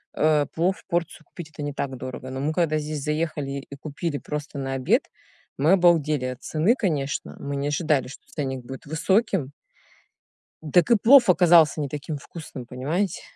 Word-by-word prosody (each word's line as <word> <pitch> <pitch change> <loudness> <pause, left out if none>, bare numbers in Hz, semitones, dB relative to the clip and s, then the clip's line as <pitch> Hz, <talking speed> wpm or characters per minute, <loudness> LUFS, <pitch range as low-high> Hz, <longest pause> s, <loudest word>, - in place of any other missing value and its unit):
э, 150 -1 +3
плов 180 +4 0
порцию 170 -2 -2
купить- 170 0 -10
это 150 - -6
не 145 0 -3
так 135 -2 -4
дорого, 130 +1 -7
но 130 - -5
мы, 150 +3 -1
когда 160 -2 +1
здесь 150 -1 -4
заехали 150 -2 -2 0.2
и 140 - -8
купили 150 0 -4
просто 150 0 -6
на 135 0 -3
обед, 130 -1 +2 0.6
мы 155 +6 +4
обалдели 160 -7 +3
от 125 0 -5
цены, 165 +10 +2
конечно. 150 - -2
Мы 140 0 -4
не 140 +1 -2
ожидали, 145 -3 +1
что 125 - -12
ценник 135 -3 -4
будет 135 +2 -9
высоким 165 - +1 1.2
так 175 +6 +5
и - - +8
плов 240 +2 +6
оказался 170 -4 +5
не 145 - -1
таким 145 +2 -5
вкусным, 145 -4 -9
понимаете? 150 +10 -2
150 Hz, 170 wpm, -24 LUFS, 140-170 Hz, 1.2 s, и